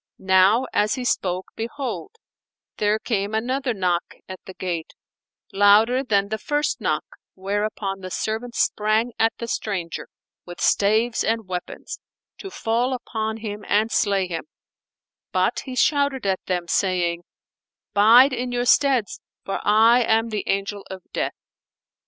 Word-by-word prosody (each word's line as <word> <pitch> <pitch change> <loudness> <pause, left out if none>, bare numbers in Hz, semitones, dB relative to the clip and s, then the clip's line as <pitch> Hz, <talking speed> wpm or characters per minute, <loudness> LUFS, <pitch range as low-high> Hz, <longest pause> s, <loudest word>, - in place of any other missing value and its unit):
Now 190 +6 +4
as 210 +1 +2
he 255 -2 -5
spoke, 185 -5 -1
behold, 260 - -5 0.6
there 210 +1 +2
came 215 -2 -2
another 255 +4 -1
knock 180 -5 -1
at 185 -1 -8
the 190 - -10
gate, 175 -3 -4 0.6
louder 210 +6 +5
than 200 -5 +1
the 220 0 -3
first 295 +4 -1
knock, - - 0 0.3
whereupon 200 0 -3
the 185 -1 -7
servants 225 +5 -3
sprang 215 +3 +1
at 225 0 +4
the 235 - -5
stranger 185 -7 -3 0.4
with 175 0 -10
staves 220 +3 +2
and 225 -2 -1
weapons, 180 -1 -6 0.4
to 390 - -7
fall 240 -4 -1
upon 220 -3 -4
him 205 0 -5
and 215 +2 +2
slay 200 -3 +2
him; 170 -2 -5 0.9
but - - +1
he 260 -2 -6
shouted 280 -2 +1
at 190 -1 +1
them, 180 -2 -1
saying, 175 -2 0 0.7
"Bide 235 +6 +7
in 250 0 -3
your 245 0 -1
steads, 260 -4 +2 0.2
for 195 - -2
I 225 +4 +5
am 225 0 +2
the 210 -3 -3
Angel 200 +1 -1
of 190 -1 -8
Death." - - -1
215 Hz, 140 wpm, -23 LUFS, 195-240 Hz, 0.9 s, Bide